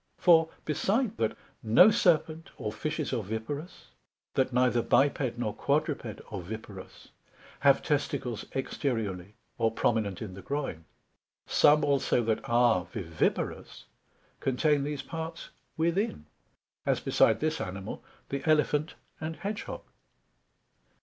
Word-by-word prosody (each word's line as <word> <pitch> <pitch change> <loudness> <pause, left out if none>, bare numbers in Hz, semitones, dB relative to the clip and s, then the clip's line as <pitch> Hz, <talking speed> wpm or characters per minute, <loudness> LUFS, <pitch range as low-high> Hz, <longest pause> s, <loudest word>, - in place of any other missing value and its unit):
For 165 -2 +5 0.2
beside 205 - 0
that, 110 - -1 0.2
no 115 - +7
Serpent, 165 -6 +2
or 105 - -3
Fishes 150 +6 -3
oviparous, 115 - -5 0.4
that 130 -1 +1
neither 125 -1 +3
biped 135 -2 +2
nor 110 -4 -2
quadruped 140 -6 -1
oviparous 100 +1 -8 0.5
have 140 -1 +4
testicles 140 -5 -1
exteriourly, 110 -8 -2 0.3
or 115 -1 +3
prominent 110 -3 0
in 105 -5 -6
the 95 - -9
groin; 135 - -4 0.6
some 150 +1 +5
also 140 -3 +2
that 110 -1 0
are 120 -6 +4
viviparous 85 -3 -2 0.5
contain 145 +2 +2
these 145 0 -3
parts 165 0 -6 0.3
within, 170 - 0 0.6
as - - +1
beside 110 -1 +3
this 155 0 -1
Animal, 95 +1 -6 0.3
the 140 0 -2
Elephant 150 0 +2 0.2
and 160 +1 -4
Hedg 205 +1 -3
hog. - - -7
135 Hz, 115 wpm, -29 LUFS, 110-155 Hz, 0.6 s, no